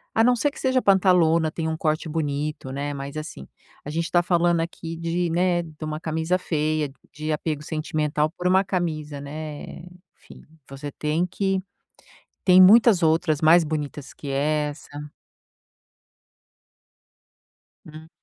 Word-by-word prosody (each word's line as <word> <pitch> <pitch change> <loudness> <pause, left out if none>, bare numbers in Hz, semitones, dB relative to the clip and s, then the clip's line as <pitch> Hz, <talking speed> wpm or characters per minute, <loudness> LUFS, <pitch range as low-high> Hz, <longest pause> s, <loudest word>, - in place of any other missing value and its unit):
a 225 - +4
não 245 +1 +4
ser 290 +5 +1
que 285 - -13
seja 260 -1 +1
pantalona, 180 -5 +3
tenha 160 0 -3
um 160 - -3
corte 155 +1 -1
bonito, 150 -3 -3
né, 140 +2 -3
mas, 140 0 -7
assim, 155 - -7 0.4
a - - -7
gente 165 +2 -2
tá 175 0 +3
falando 175 -1 +2
aqui 165 0 -6
de, 170 +1 -1
né, 175 +1 +1
de 160 -2 -11
uma 155 0 -4
camisa 160 +2 -1
feia, 155 -3 -1 0.2
de 155 +1 -4
apego 150 -1 -2
sentimental 155 -1 -1
por 180 +1 -3
uma 190 +1 +4
camisa, 155 -6 -3
né, 150 +1 -7 0.5
enfim, - - -16 0.3
você 140 +1 -7
tem 155 +4 -1
que 195 +1 -1 0.9
tem 185 -1 +7
muitas 205 -1 +7
outras 160 -1 +2
mais 165 +2 +6
bonitas 150 -2 -5
que 145 - -10
essa 150 +1 -1 3.0
Hum. 155 +1 -12
160 Hz, 140 wpm, -24 LUFS, 150-175 Hz, 3.0 s, tem